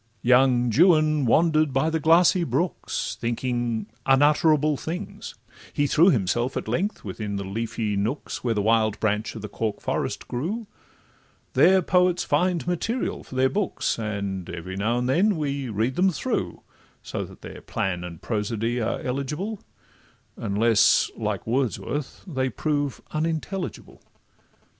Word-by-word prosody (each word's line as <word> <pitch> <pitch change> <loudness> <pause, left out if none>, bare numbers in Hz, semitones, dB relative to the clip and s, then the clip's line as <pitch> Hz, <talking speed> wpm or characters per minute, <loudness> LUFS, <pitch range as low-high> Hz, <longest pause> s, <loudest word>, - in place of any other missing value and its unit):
Young 125 -1 +4
Juan 155 - +4
wander'd 155 +2 +3
by 155 +4 +1
the 160 - 0
glassy 170 +3 +4
brooks, 165 +5 -2
Thinking 120 -2 -1 0.2
unutterable 150 +2 +4
things; 175 +7 -6 0.4
he 145 - +1
threw 165 +6 +5
Himself 120 - 0
at - - -4
length 200 +5 -1
within 100 +1 -4
the 100 - -3
leafy 110 +1 -3
nooks 110 +9 -3
Where 115 -2 0
the 105 - 0
wild 110 -1 +2
branch 105 +1 -1
of 110 - -7
the - - -4
cork 105 0 -3
forest - - -3
grew; 180 - -3 0.9
There 190 0 +5
poets 180 +1 +2
find 180 -2 +1
materials 205 +8 -2
for - - -9
their 130 +1 +4
books, 195 - -1
And 100 -4 -3
every 85 +2 -6
now 110 +5 0
and 125 0 -1
then 185 +9 +3
we 140 -3 -2
read 110 +4 -1
them 190 +2 +4
through, 170 - -3 0.4
So - - -4
that - - -13
their - - -9
plan 90 -2 -2
and 85 -2 -8
prosody 115 +2 -1
are 110 - -2
eligible, 150 - -3 0.7
Unless, 110 +1 +3
like - - -3
Wordsworth, 135 +3 -2
they 130 -8 -1
prove 145 -1 -2
unintelligible. 165 +4 -3
130 Hz, 140 wpm, -25 LUFS, 110-160 Hz, 0.9 s, threw